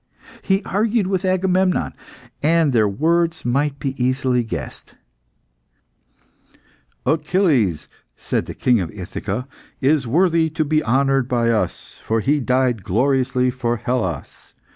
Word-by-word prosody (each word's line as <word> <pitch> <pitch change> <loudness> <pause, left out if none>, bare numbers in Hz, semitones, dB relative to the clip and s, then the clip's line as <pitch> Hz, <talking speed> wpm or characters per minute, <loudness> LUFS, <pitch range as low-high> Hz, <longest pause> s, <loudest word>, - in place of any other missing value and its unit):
He 195 +1 +1
argued 215 +1 0
with 190 0 -1
Agamemnon, 185 0 +1 0.5
and 160 -2 +3
their 110 -3 +4
words 165 +8 0
might 140 +3 0
be 135 -2 -3
easily 130 -1 +1
guessed 115 - -7 2.1
"Achilles," 155 - +1 0.3
said - - -2
the - - -7
King 120 -5 +2
of 85 - -4
Ithaca, 100 +5 -5 0.3
"is 140 -1 +2
worthy 165 +3 +2
to 155 0 -1
be 155 +1 +1
honoured 135 +1 +2
by 120 -2 +1
us, 110 - -3
for 115 0 0
he 145 +6 +1
died 125 -4 +1
gloriously 130 +4 +1
for 120 -2 -2
Hellas. 95 - -4
135 Hz, 120 wpm, -20 LUFS, 120-165 Hz, 2.1 s, their